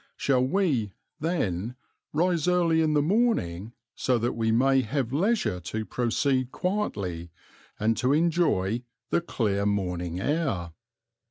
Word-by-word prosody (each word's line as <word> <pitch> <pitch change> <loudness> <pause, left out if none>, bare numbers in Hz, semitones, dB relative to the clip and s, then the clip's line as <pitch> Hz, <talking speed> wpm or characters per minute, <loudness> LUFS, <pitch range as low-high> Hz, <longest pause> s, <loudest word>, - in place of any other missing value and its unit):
Shall 130 -2 +2
we, 130 - +1 0.3
then, 120 - -1 0.4
rise 170 +1 +1
early 170 -2 +3
in 155 -1 +2
the 145 - +3
morning, 130 - 0 0.2
so 125 -1 +1
that 120 +1 0
we 110 -1 0
may 135 +3 +4
have 130 +1 -2
leisure 190 - +1
to 110 +5 -4
proceed 130 +2 0
quietly 100 - -2 0.5
and 110 +2 +2
to 125 +3 +1
enjoy 150 - +2 0.3
"the - - +2
clear 105 - -1
morning 90 -3 -2
air"? 130 - -1
125 Hz, 125 wpm, -27 LUFS, 100-160 Hz, 0.5 s, may